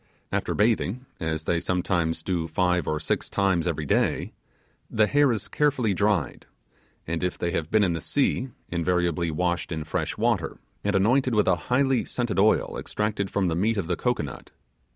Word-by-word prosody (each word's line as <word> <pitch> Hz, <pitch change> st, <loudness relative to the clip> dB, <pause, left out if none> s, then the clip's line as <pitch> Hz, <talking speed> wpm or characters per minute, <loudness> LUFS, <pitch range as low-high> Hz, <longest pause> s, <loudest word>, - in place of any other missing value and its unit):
After -, -, -1 dB
bathing, 115 Hz, +2 st, +1 dB
as 80 Hz, -1 st, -2 dB
they 85 Hz, +1 st, +1 dB
sometimes 85 Hz, -2 st, -1 dB
do 85 Hz, -3 st, -1 dB
five 90 Hz, 0 st, +1 dB
or 75 Hz, -, 0 dB
six -, -, -2 dB
times 95 Hz, -4 st, +1 dB
every 80 Hz, -3 st, -2 dB
day, -, -, +1 dB, 0.6 s
the 110 Hz, -, +3 dB
hair 145 Hz, +3 st, +3 dB
is 110 Hz, -4 st, -2 dB
carefully 135 Hz, -8 st, +1 dB
dried, 95 Hz, -, 0 dB, 0.6 s
and 85 Hz, +1 st, -3 dB
if 90 Hz, -, -1 dB
they 85 Hz, -, -1 dB
have 80 Hz, -2 st, -2 dB
been 110 Hz, -1 st, +4 dB
in 90 Hz, -3 st, +2 dB
the 80 Hz, -, -3 dB
sea, 135 Hz, -, 0 dB, 0.2 s
invariably 85 Hz, 0 st, 0 dB
washed 85 Hz, +1 st, -1 dB
in 80 Hz, -2 st, -3 dB
fresh 80 Hz, -, -3 dB
water, -, -, 0 dB, 0.3 s
and -, -, 0 dB
anointed 125 Hz, +5 st, +3 dB
with 105 Hz, -, +3 dB
a 95 Hz, -, +5 dB
highly 130 Hz, 0 st, +3 dB
scented 120 Hz, -5 st, -2 dB
oil 105 Hz, +2 st, +2 dB
extracted 105 Hz, -2 st, -2 dB
from 100 Hz, -2 st, 0 dB
the 80 Hz, -, 0 dB
meat 110 Hz, +6 st, +1 dB
of 100 Hz, -, -1 dB
the 90 Hz, +1 st, -1 dB
cocoanut. 80 Hz, -, -3 dB
90 Hz, 175 wpm, -26 LUFS, 85-110 Hz, 0.6 s, a